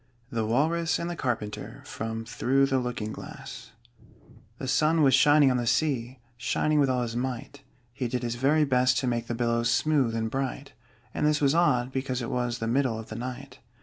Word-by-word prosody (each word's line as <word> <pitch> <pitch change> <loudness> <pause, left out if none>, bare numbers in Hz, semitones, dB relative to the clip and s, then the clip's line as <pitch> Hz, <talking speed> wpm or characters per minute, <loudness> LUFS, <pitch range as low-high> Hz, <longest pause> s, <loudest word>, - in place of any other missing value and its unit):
THE 115 -2 -1
WALRUS 160 +8 +1
AND 170 +1 -3
THE - - -4
CARPENTER 115 -8 -4
From 115 0 -5
'Through 130 +4 +2
the 135 -1 +1
Looking 120 -4 -4
Glass' - - -9 0.9
The 130 - -5
sun 155 +4 +3
was 135 -2 +5
shining 145 -2 +6
on 125 - +1
the 120 -1 -2
sea, 130 -3 0 0.2
Shining 150 +5 +1
with 140 -2 +3
all 125 -1 +1
his 115 -1 -4
might: 130 +2 -4 0.3
He 125 0 -3
did 125 +1 -3
his 120 -1 -1
very 145 +5 +2
best 130 -1 +3
to 130 - 0
make 120 -1 -1
The 120 - -2
billows 115 0 +1
smooth 135 -2 +2
and 110 0 -1
bright 135 +1 -4 0.4
And - - -2
this 150 -1 +2
was 140 -1 +3
odd, 130 -7 +2
because 130 -1 -2
it 120 - -4
was 125 -1 -1
The 115 - -4
middle 120 0 +1
of 110 0 -8
the 110 - -6
night. 130 +2 -7
125 Hz, 200 wpm, -27 LUFS, 120-140 Hz, 0.9 s, shining